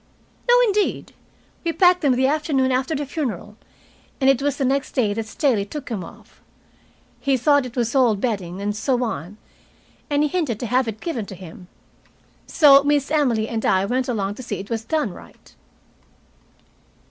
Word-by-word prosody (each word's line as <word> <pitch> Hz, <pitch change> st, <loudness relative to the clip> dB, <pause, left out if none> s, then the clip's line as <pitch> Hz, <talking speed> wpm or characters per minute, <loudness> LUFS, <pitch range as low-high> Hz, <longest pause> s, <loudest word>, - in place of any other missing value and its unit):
"No, -, -, +7 dB
indeed. 420 Hz, -4 st, 0 dB, 0.5 s
We 335 Hz, -, 0 dB
packed 360 Hz, 0 st, +4 dB
them 275 Hz, -5 st, +3 dB
the 260 Hz, +1 st, +2 dB
afternoon 280 Hz, -2 st, +1 dB
after 260 Hz, +5 st, 0 dB
the 290 Hz, 0 st, -3 dB
funeral, 240 Hz, -, -4 dB, 0.6 s
and 270 Hz, -1 st, +5 dB
it 270 Hz, -, -1 dB
was 285 Hz, 0 st, -1 dB
the 275 Hz, -, 0 dB
next 270 Hz, +1 st, -1 dB
day 220 Hz, -6 st, +1 dB
that 220 Hz, +1 st, -4 dB
Staley 235 Hz, -4 st, +1 dB
took 270 Hz, +7 st, -8 dB
them 210 Hz, -6 st, -3 dB
off. -, -, -15 dB, 0.8 s
He 275 Hz, -1 st, +1 dB
thought 285 Hz, +1 st, +3 dB
it 240 Hz, -, -13 dB
was 235 Hz, -2 st, -1 dB
old 245 Hz, -7 st, +3 dB
bedding 195 Hz, -6 st, -3 dB
and 205 Hz, 0 st, -2 dB
so 250 Hz, +3 st, 0 dB
on, 200 Hz, -3 st, -5 dB, 0.7 s
and 290 Hz, 0 st, +2 dB
he 300 Hz, -, +1 dB
hinted 285 Hz, -, -1 dB
to -, -, -2 dB
have 250 Hz, +2 st, +1 dB
it 220 Hz, -1 st, -5 dB
given 245 Hz, -, -4 dB
to 190 Hz, -, -8 dB
him. 180 Hz, 0 st, -12 dB, 0.8 s
So 280 Hz, -4 st, +6 dB
Miss 290 Hz, -1 st, +1 dB
Emily 245 Hz, -8 st, +1 dB
and 225 Hz, -1 st, -3 dB
I 190 Hz, 0 st, +2 dB
went 250 Hz, +4 st, -1 dB
along 205 Hz, -5 st, -2 dB
to -, -, -9 dB
see 245 Hz, -, -4 dB
it 200 Hz, +4 st, -9 dB
was 225 Hz, -1 st, -2 dB
done 265 Hz, -, -1 dB
right." -, -, -16 dB
255 Hz, 180 wpm, -22 LUFS, 215-285 Hz, 0.8 s, No